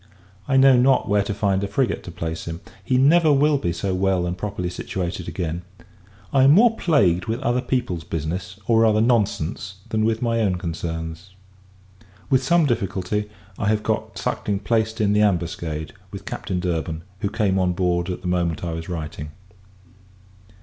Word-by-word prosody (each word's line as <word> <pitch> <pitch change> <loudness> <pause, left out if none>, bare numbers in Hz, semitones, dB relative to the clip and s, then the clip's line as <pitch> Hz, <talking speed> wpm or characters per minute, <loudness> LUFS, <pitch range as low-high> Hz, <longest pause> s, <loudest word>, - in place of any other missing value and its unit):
I 135 -1 +3
know 135 0 +7
not 125 -1 +3
where 100 0 +3
to 100 - -3
find 100 -1 0
a - - -1
frigate 120 +5 0
to 85 - -7
place 80 -1 -5
him. 85 +1 -6 0.2
He 125 +5 +1
never 155 +4 +5
will 145 +1 +3
be 85 - -1
so 95 +3 -2
well 95 -1 +1
and 90 0 -2
properly 90 -2 -4
situated 90 -1 -4
again. 85 0 -3 0.7
I 135 - +5
am 135 +2 +7
more 225 +5 +5
plagued 95 - +2
with 115 +2 -2
other 125 -2 +1
people's 110 -11 -2
business, 85 +4 -4
or 115 +1 +3
rather 110 -1 +4
nonsense, 105 -5 0
than 110 0 0
with 110 0 +1
my 115 -1 +1
own 100 -5 +1
concerns, 85 +1 -5 1.0
With 130 -1 +4
some 165 +5 +3
difficulty, 105 -3 -1 0.3
I 105 - 0
have 105 0 +1
got - - -2
Suckling 100 -1 -2
placed 110 +1 0
in 105 -1 +2
the 105 - +3
Ambuscade, 85 -5 -1 0.2
with - - -9
Captain 90 - -3
Durban, 85 -2 -2 0.2
who 100 - -1
came 100 -3 +1
on 90 -1 +1
board 90 0 0
at 90 - -4
the - - -3
moment 85 -2 0
I 85 -1 -2
was 80 +2 -6
writing. 75 -3 -5
95 Hz, 175 wpm, -23 LUFS, 85-115 Hz, 1.0 s, know